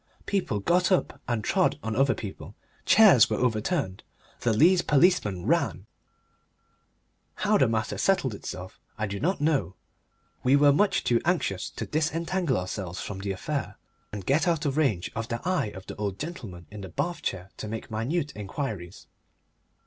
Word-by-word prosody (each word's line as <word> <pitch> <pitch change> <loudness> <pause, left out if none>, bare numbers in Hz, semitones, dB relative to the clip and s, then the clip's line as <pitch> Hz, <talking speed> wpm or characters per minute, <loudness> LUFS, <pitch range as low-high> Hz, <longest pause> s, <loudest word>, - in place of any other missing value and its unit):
People 180 - -1
got 180 - +2
up 185 - +1
and 120 -3 -1
trod 185 - +2
on 110 0 -2
other 135 -1 +3
people, 95 -3 -8 0.3
chairs 200 - +7
were 110 - 0
overturned, 115 - -1 0.4
the 120 - +1
Leas 175 - +5
policeman 145 - +2
ran. - - +1 1.5
How - - +2
the - - +5
matter 110 0 -1
settled 190 - +2
itself 95 -2 -8 0.2
I 110 - -1
do 100 -1 -4
not 185 +5 0
know 145 - +1 0.7
we 130 +2 +4
were 145 0 +6
much 195 +6 +2
too 120 -1 +2
anxious 160 - 0
to - - -6
disentangle 160 0 0
ourselves 90 0 -4
from 100 -2 -5
the 100 0 -3
affair 105 +3 -3 0.4
and 100 -3 -6
get 150 +6 +2
out 165 -2 +1
of 140 -2 0
range 125 - +1
of 115 0 -3
the 120 -1 -3
eye 185 -11 +1
of 95 -2 -9
the - - -7
old 100 -2 -3
gentleman 110 - -7
in 105 -1 -8
the 95 - -7
bath 170 - -3
chair 95 0 -4
to - - -5
make 110 +1 -6
minute 140 +8 -1
inquiries. 100 - -5
120 Hz, 165 wpm, -27 LUFS, 100-160 Hz, 1.5 s, chairs